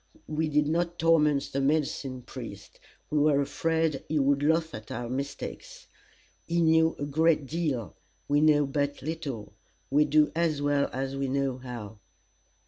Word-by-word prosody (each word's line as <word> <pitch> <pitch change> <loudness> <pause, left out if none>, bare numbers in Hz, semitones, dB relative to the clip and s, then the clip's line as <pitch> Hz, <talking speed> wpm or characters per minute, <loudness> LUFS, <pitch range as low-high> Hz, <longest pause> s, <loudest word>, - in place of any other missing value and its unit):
We 155 +1 -1
did 150 0 +2
not 170 +2 0
torment 150 -4 +3
the 140 - 0
medicine 135 -3 -1
priest. - - -9 0.3
We 150 - +2
were 145 -1 +4
afraid 160 +1 0
he 155 - 0
would 140 0 +2
laugh 160 +2 +1
at 105 0 -8
our 120 +1 -4
mistakes. 140 - -6 0.6
He 170 +1 0
knew 160 0 +4
a 145 - -3
great 155 +1 +2
deal. 135 - -2 0.3
We 145 +1 +3
know 150 -1 +5
but 145 0 -2
little. 145 -8 -5 0.4
We 150 +2 +4
do 150 0 +3
as 165 -3 +1
well 145 0 +1
as 135 +1 -3
we 135 0 -1
know 135 -1 -1
how. 115 -5 -8
145 Hz, 155 wpm, -28 LUFS, 135-160 Hz, 0.6 s, know